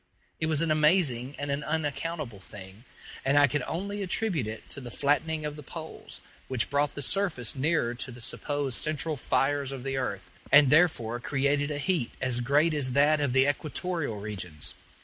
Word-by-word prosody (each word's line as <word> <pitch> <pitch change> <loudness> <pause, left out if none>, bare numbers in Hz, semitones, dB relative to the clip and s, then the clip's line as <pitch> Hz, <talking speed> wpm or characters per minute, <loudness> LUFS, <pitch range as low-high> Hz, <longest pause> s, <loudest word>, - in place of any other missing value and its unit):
It 155 - 0
was 155 0 +2
an 165 - +1
amazing 150 -5 +3
and 145 0 -3
an 140 +1 -1
unaccountable 150 - -2
thing, 95 +3 -11 0.4
and 140 +2 +2
I 145 - +8
could 145 +1 0
only 200 +4 -3
attribute 185 - -1
it 110 0 -7
to 140 - -7
the 125 - -7
flattening 150 +4 0
of 150 -1 -4
the 150 - -9
poles, 160 +3 -8 0.3
which 125 -3 -1
brought 145 0 +1
the 145 - -3
surface 165 - 0
nearer 140 -3 +1
to 125 +2 -3
the 120 - -11
supposed 140 +1 -2
central 155 +1 0
fires 140 +1 0
of 135 -2 -6
the 135 0 -2
earth, 100 -8 -3 0.2
and 145 -2 +7
therefore 145 -8 +3
created 140 +2 +1
a 150 - -2
heat 155 -4 0
as 130 -2 -1
great 145 +6 +3
as 135 -4 +1
that 145 +2 +4
of 140 -3 +1
the 130 +2 +4
equatorial 155 - -2
regions. 90 -7 -4
145 Hz, 185 wpm, -28 LUFS, 125-155 Hz, 0.4 s, I